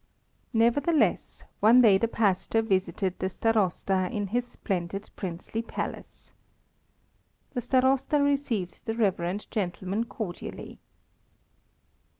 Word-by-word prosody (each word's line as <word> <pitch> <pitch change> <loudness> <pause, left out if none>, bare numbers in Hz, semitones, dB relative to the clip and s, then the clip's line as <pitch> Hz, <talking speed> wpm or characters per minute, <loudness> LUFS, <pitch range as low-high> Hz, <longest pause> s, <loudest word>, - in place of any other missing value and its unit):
Nevertheless, 260 +7 +2 0.2
one 225 +4 +7
day 200 -4 +6
the 230 - +1
pastor 220 0 +1
visited 190 -2 -1
the 185 - -1
Starosta 190 -3 +1
in 205 -1 -2
his 245 +3 -1
splendid 195 -2 -4
princely 190 +4 -4
palace. 230 - -7 1.2
The 245 - -2
Starosta 265 +4 +2
received 275 -12 -1
the 225 - -1
reverend 195 -3 0
gentleman 195 +1 -2
cordially. 210 -6 -7
215 Hz, 100 wpm, -27 LUFS, 185-235 Hz, 1.2 s, one